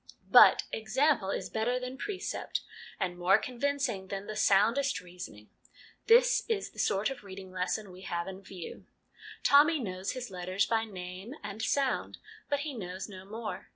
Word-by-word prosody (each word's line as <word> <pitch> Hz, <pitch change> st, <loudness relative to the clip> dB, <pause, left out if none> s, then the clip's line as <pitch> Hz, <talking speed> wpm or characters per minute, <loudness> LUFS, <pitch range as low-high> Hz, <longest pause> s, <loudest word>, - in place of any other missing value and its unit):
But -, -, +8 dB
example 240 Hz, -1 st, +1 dB
is -, -, -3 dB
better 240 Hz, +3 st, 0 dB
than 250 Hz, +1 st, -5 dB
precept, 380 Hz, +7 st, -3 dB, 0.4 s
and 180 Hz, -2 st, -2 dB
more 180 Hz, +2 st, +5 dB
convincing 255 Hz, -6 st, -2 dB
than 195 Hz, +1 st, -5 dB
the 215 Hz, -, -6 dB
soundest 230 Hz, +8 st, +3 dB
reasoning. 175 Hz, -13 st, -10 dB, 0.6 s
This -, -, +6 dB
is 435 Hz, -3 st, -1 dB
the -, -, -12 dB
sort 200 Hz, +5 st, +1 dB
of 270 Hz, -, -8 dB
reading 190 Hz, -1 st, -9 dB
lesson 185 Hz, +2 st, -2 dB
we 180 Hz, +1 st, -12 dB
have 170 Hz, -2 st, -3 dB
in 190 Hz, 0 st, -7 dB
view. 185 Hz, -3 st, -9 dB, 0.6 s
Tommy 300 Hz, +3 st, +6 dB
knows 190 Hz, -5 st, -3 dB
his 255 Hz, -4 st, -6 dB
letters 185 Hz, +2 st, 0 dB
by 225 Hz, 0 st, +1 dB
name 185 Hz, +4 st, -8 dB
and 205 Hz, +1 st, -6 dB
sound, 265 Hz, +4 st, 0 dB, 0.3 s
but 285 Hz, -1 st, +1 dB
he 300 Hz, -1 st, -4 dB
knows 185 Hz, -5 st, -6 dB
no 190 Hz, -2 st, -10 dB
more. 220 Hz, +2 st, -6 dB
210 Hz, 160 wpm, -30 LUFS, 185-255 Hz, 0.6 s, But